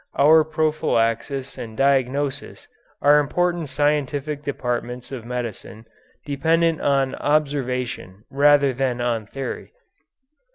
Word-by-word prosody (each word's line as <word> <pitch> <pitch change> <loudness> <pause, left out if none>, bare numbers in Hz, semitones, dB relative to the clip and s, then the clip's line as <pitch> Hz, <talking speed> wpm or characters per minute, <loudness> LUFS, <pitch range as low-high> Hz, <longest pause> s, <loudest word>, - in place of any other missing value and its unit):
Our 155 +3 +6
prophylaxis 140 -5 -1
and 110 -2 -8
diagnosis 135 0 0 0.4
are 145 +1 +6
important 175 +2 -1
scientific 145 0 -1
departments 125 -3 -4
of 125 -4 -7
medicine 120 -2 -6 0.4
dependent 160 +3 +1
on 135 -2 +1
observation 125 -9 -2
rather 140 -1 +4
than 125 -1 -1
on 115 -3 -1
theory. 135 +3 -6
140 Hz, 95 wpm, -22 LUFS, 125-150 Hz, 0.4 s, Our